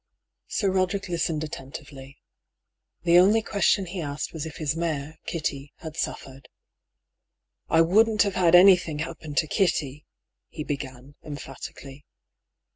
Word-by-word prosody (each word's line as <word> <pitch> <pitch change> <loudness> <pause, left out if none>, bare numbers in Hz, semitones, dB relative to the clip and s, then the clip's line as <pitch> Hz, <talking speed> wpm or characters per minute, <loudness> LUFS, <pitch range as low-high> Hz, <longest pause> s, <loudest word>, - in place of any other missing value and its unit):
Sir 195 -3 0
Roderick 190 +1 0
listened 165 -2 -1
attentively. 135 -1 -9 0.9
The 170 0 +6
only 210 +5 +4
question 200 -2 +2
he 180 +1 -5
asked 145 -1 -4
was 160 -1 -4
if 160 - -9
his 155 -1 -1
mare, 160 -2 -3
Kitty, 145 -4 -3
had 160 -2 -9
suffered. 135 -4 -5 0.6
" 80 0 -58
I 165 - +5
wouldn't 215 +6 +4
have 200 -2 -1
had 175 -2 +4
anything 175 -4 +6
happen 155 -1 -6
to 150 - +3
Kitty," 150 -4 -1 0.4
he 150 - -6
began, 140 -1 -6
emphatically. 140 -1 -9
160 Hz, 130 wpm, -25 LUFS, 140-180 Hz, 0.9 s, The